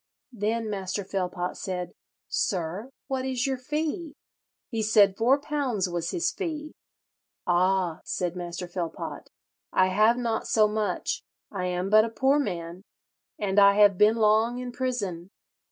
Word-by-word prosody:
Then 225 +1 -1
Master 200 -1 -3
Philpot 180 -2 -3
said, 180 -2 -4 0.4
'Sir, 185 +4 -2 0.2
what 265 -2 -2
is 260 -2 -1
your 265 -2 -1
fee?' 305 +3 -3 0.6
He 225 -2 -1
said 210 -2 +5
four 250 +7 +3
pounds 280 -9 -1
was 175 -1 -3
his 345 - 0
fee. 310 -5 -5 0.7
'Ah,' 180 -1 +2
said 180 -1 -2
Master 175 0 -5
Philpot, 175 -2 -5 0.4
'I 185 - +4
have 215 +5 +4
not 230 -2 -1
so 215 -1 +4
much; 210 -3 -2 0.3
I 185 -3 -3
am 180 +2 -2
but 215 0 +7
a 230 - -2
poor 265 +6 +2
man, 175 -7 -4 0.6
and 205 -1 +1
I 200 0 +7
have 205 -3 +5
been 215 +2 +6
long 220 +2 +3
in 250 0 -5
prison.' 205 -9 -3
210 Hz, 145 wpm, -27 LUFS, 185-245 Hz, 0.7 s, but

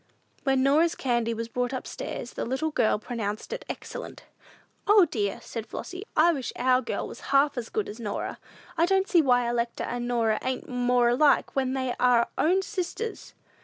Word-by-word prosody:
When 270 -1 +3
Norah's 310 +5 +3
candy 235 -3 0
was 230 0 -3
brought 245 +2 -2
up 255 - -5
stairs, 245 - -6
the - - -3
little 265 +6 -1
girls 215 -6 +1
pronounced 220 - -4
it - - -5
excellent. - - -7 0.6
"O, 410 -2 +7
dear," 210 -10 -2
said 230 -1 -6
Flossy, 365 +2 -6
"I 335 +2 +6
wish 265 -5 -4
our 255 +1 +3
girl 245 - -3
was - - -9
half 280 +1 +4
as 240 -3 -4
good 430 -1 -2
as 215 - -8
Norah! 210 -3 -4 0.4
I 335 - +4
don't 385 +1 +2
see 345 - +5
why 245 -4 +3
Electa 235 0 -1
and 240 0 -3
Norah 230 -3 +1
ain't 260 0 -3
more 245 -1 +2
alike 285 +5 +3
when 260 -1 +1
they 260 -2 -1
are 245 -2 +4
own 370 +4 +3
sisters!" 425 +4 -5
255 Hz, 185 wpm, -27 LUFS, 235-315 Hz, 0.6 s, O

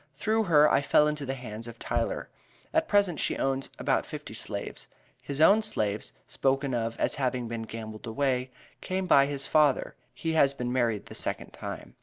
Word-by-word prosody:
Through 220 +8 +1
her 150 -4 +6
I 140 - +3
fell 150 +1 +4
into 150 -2 -2
the 135 - -2
hands 115 -3 -7
of 115 0 -9
Tyler. - - -2 0.5
At 320 0 +2
present 200 -6 +2
she - - 0
owns 135 0 -1
about - - +1
fifty - - -7
slaves. - - -6 0.3
His 140 0 -5
own 200 +7 +7
slaves, 105 - -2
spoken 135 0 0
of 115 -1 -2
as - - +2
having 125 -2 0
been 115 0 -4
gambled 110 0 -7
away, 130 +1 0 0.3
came 185 0 -2
by 140 -6 +5
his 140 -1 -3
father 150 -3 +3 0.2
he 165 -1 -2
has 140 -3 +4
been 125 -2 -3
married 115 -5 +1
the - - -10
second - - -4
time." - - -7
135 Hz, 185 wpm, -28 LUFS, 120-155 Hz, 0.5 s, own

